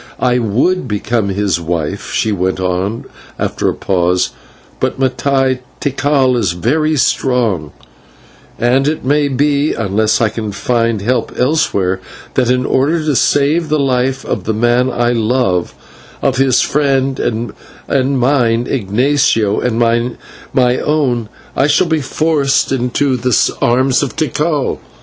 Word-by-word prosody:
I 125 -1 +2
would 125 - 0
become 105 0 -1
his 100 -2 0
wife," 85 -2 -3
she 110 - 0
went 95 -1 -1
on 95 +4 -2 0.3
after - - -1
a - - -3
pause, 90 -1 0 0.5
"but, - - -1
Mattai, 130 0 +1 0.2
Tikal 135 -2 +1
is 100 -7 0
very 155 - 0
strong, 120 - 0 0.9
and 130 +4 +2
it 155 -3 -2
may 145 +2 +2
be, 145 +2 +1
unless 110 0 +1
I 115 - +2
can 110 -1 -5
find 115 -3 0
help 120 +1 0
elsewhere, 125 - +1 0.3
that 125 -2 +1
in 125 +1 +1
order 145 +6 +1
to 150 -3 +1
save 145 +6 +2
the 155 - +2
life 135 -1 0
of - - -3
the 110 - -1
man 120 +3 +2
I 120 -1 0
love, 115 -6 0 0.5
of 135 - +1
his 135 -2 +3
friend 135 -2 0
and 115 -1 -2 0.7
mine, 120 -3 +2
Ignatio, 120 -1 +1
and 120 -2 -1 0.8
my 125 -1 +3
own, 130 -7 0 0.3
I 135 - +2
shall 155 +5 +3
be 160 -2 0
forced 145 0 +1
into 130 +1 0
the 125 0 +1 0.2
arms 130 +2 +2
of 140 - -3
Tikal. 150 -2 -1
125 Hz, 135 wpm, -15 LUFS, 110-140 Hz, 0.9 s, his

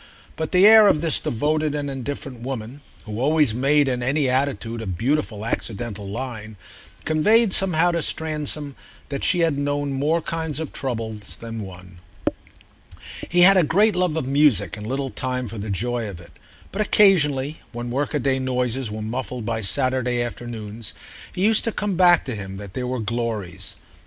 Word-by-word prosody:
But 160 -1 -3
the 185 +2 +6
air 220 0 +9
of 150 - +3
this 165 -3 +2
devoted 150 +5 0
and 145 -1 -2
indifferent 135 -2 -6
woman, 125 +1 -6 0.2
who 105 0 -5
always 150 -2 +3
made, 140 +4 +3
in 125 -2 -1
any 140 +3 +1
attitude, 125 -3 -1
a 110 - -6
beautiful 110 - -1
accidental 110 -3 -4
line, 110 -1 -6 0.5
conveyed 210 +7 +3
somehow 175 -2 +3
to 170 -1 -1
Stransom 150 -3 -2 0.3
that 140 -1 -4
she 180 -3 +3
had 160 -4 +1
known 145 0 -1
more 150 +5 +1
kinds 160 -2 -3
of 160 - -5
trouble 115 -4 -3 0.2
than 115 -1 -6
one. 90 -2 -11 1.3
He 175 +1 +3
had 195 +2 +8
a - - +6
great 205 +6 +3
love 180 -3 +1
of 160 - -1
music 135 - +3
and 105 0 -7
little 135 +1 -2
time 125 -1 -2
for 110 0 -7
the 105 +2 -5
joy 115 +3 -2
of 90 -4 -9
it; 85 - -15 0.4
but 205 - -2
occasionally, 155 -9 +4
when 120 0 -5
workaday 135 0 0
noises 125 -1 -1
were 105 0 -5
muffled 125 +1 -4
by 115 -1 -2
Saturday 130 +2 0
afternoons, 115 -2 -6 0.4
it 185 - -3
used 215 +2 +4
to 230 - 0
come 210 -2 -2
back 175 -1 +5
to 130 - -3
him 95 -2 -7
that 100 -1 -9
there 125 +1 -3
were 130 +1 -2
glories. 110 -5 -4
130 Hz, 170 wpm, -22 LUFS, 115-155 Hz, 1.3 s, air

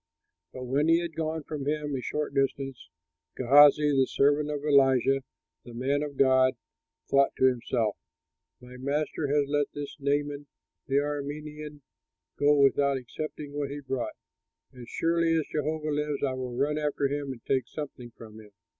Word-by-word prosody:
But 130 - -8
when 135 +5 +1
he 165 +1 +5
had 170 -1 -4
gone 160 -1 -2
from 145 -2 -5
him 150 -1 -1
a 130 - -3
short 150 +3 -3
distance, 135 -1 -2 0.5
Gehazi, 145 +3 +6
the 135 -2 +3
servant 145 +2 +2
of 145 -1 -4
Elisha 135 -2 +4 0.4
the 120 - -11
man 135 +4 0
of 145 -2 -5
God, 130 -1 +4 0.5
thought 140 0 +3
to - - +2
himself, 120 -4 0 0.6
"My 125 0 -12
master 145 +3 -2
has 145 0 +1
let 145 0 +1
this 145 -1 -6
Naaman 145 +1 -1 0.4
the 135 - -1
Aramean 150 +1 -3 0.5
go 145 +1 +4
without 140 0 +3
accepting 145 +3 -7
what 145 -1 -3
he 145 +1 -5
brought! 135 -3 -4 0.6
As 120 -2 -11
surely 165 0 +1
as 160 -2 +1
Jehovah 155 +1 -2
lives, 150 -1 -2
I 135 -2 +1
will 125 -2 -5
run 150 +3 0
after 145 -2 0
him 140 0 -3
and 120 -3 -10
take 130 -2 0
something 135 -5 -7
from 110 -1 -12
him." 105 -1 -14
145 Hz, 165 wpm, -28 LUFS, 130-150 Hz, 0.6 s, Gehazi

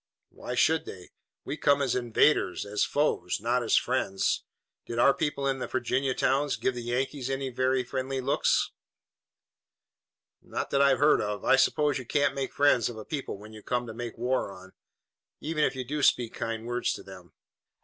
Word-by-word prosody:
"Why 125 - -6
should 160 +6 +3
they? 90 -2 -10 0.3
We 150 - -4
come 145 -2 +3
as 140 -2 +1
invaders, 125 +3 +2
as 105 0 0
foes, 140 -12 0
not 120 +4 +1
as 115 - +2
friends. 100 -7 0 0.4
Did 115 - -5
our 135 +3 +5
people 145 -2 -2
in 135 -1 0
the - - -3
Virginia 130 +1 -1
towns 140 +2 +1
give 130 - -1
the 120 - -5
Yankees 130 +2 -2
any 135 0 -2
very 130 +1 +1
friendly 130 +2 -3
looks?" 130 +2 +1 1.7
"Not - - -5
that 140 - +3
I've 140 -2 +5
heard 150 +1 +4
of. 105 -1 -3
I - - +6
suppose 145 +1 +2
you 130 - -8
can't 145 0 +2
make 135 -1 -3
friends 140 -5 +3
of 120 - -8
a 110 - -8
people 140 -8 -4
whom 105 +2 -12
you 110 - -11
come 125 +2 -2
to 115 - -7
make 120 0 -6
war 125 -3 -1
on, 95 0 -13 0.7
even 155 -1 -1
if - - +1
you 130 - -3
do 150 +4 -3
speak 120 -4 +3
kind 115 0 -4
words 120 +1 -1
to - - -8
them." 95 -2 -13
130 Hz, 190 wpm, -28 LUFS, 115-140 Hz, 1.7 s, I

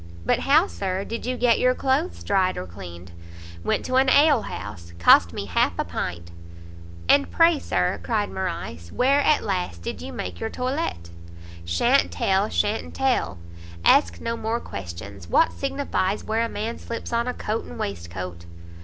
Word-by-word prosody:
"But - - +2
how, 305 +6 +4
Sir, 190 - -3
did 230 +1 -5
you 255 0 -1
get 240 -1 +3
your 255 0 +3
cloaths 275 +8 0
dried, 190 -2 +1
or 90 - -4
cleaned?" 85 -1 -10 0.5
"Went - - 0
to 255 0 +1
an 265 0 +4
alehouse; 105 - +2
cost 85 0 +6
me 100 - -5
half 90 - +1
a - - -1
pint." 85 -1 -5 0.8
"And 280 0 +4
pray, 330 -2 +4
Sir," 90 - 0
cried 90 +1 -1
Morrice, 85 -3 -5
"where, 275 +3 +3
at 300 +1 +3
last, 180 - -3
did 85 - -5
you 85 +2 -6
make 85 0 -5
your - - -2
toilette?" 250 - -3 0.5
"Sha'n't 85 0 +3
tell, 190 - +1
sha'n't 210 +1 -1
tell; 265 - 0 0.5
ask 85 0 +4
no 230 - -2
more 230 +1 -2
questions. 95 - -8
What 325 - +4
signifies 275 -8 -1
where 220 +1 0
a 230 - -2
man 225 +2 -4
slips 235 0 -6
on 235 +1 +1
a 250 - -1
coat 215 +2 -3
and 80 - -9
waist 85 -4 -4
coat?" 90 -1 -7
190 Hz, 170 wpm, -24 LUFS, -, 0.8 s, cost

